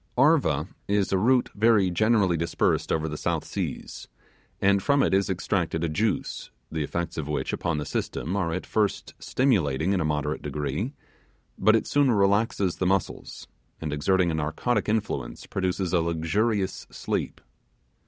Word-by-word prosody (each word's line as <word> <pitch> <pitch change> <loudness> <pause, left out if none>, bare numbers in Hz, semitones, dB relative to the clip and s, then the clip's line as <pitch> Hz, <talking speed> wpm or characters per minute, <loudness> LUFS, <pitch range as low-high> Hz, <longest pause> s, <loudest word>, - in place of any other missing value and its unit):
'Arva' 135 - +3 0.2
is 100 -1 +1
a - - +4
root 125 +4 +3
very 105 -3 +3
generally 105 -1 +3
dispersed 85 0 0
over 80 0 0
the 75 -1 -5
South - - -1
Seas, - - -5 0.5
and 100 0 +3
from 140 +4 +3
it - - +1
is 95 0 +2
extracted 90 -3 -1
a 85 - 0
juice, 105 +6 -1 0.2
the 80 -1 -2
effects 85 +2 -3
of 75 - -4
which 75 - -2
upon 85 -2 -1
the 75 - -3
system 85 +6 -3
are 90 -5 0
at 90 +3 -3
first 105 -2 -1
stimulating 95 - +1
in 95 - +1
a - - +1
moderate 75 0 -1
degree; 75 - -3 0.6
but 110 +3 +4
it 110 - +1
soon 145 -2 +3
relaxes 100 -3 +2
the 95 - 0
muscles, 95 -2 -2 0.3
and 75 -2 -3
exerting 90 +4 +2
a - - -2
narcotic 80 +9 -1
influence 100 - -2
produces 95 -1 -2
a 90 - +4
luxurious 95 +5 -1
sleep. - - -3
95 Hz, 160 wpm, -26 LUFS, 80-105 Hz, 0.6 s, a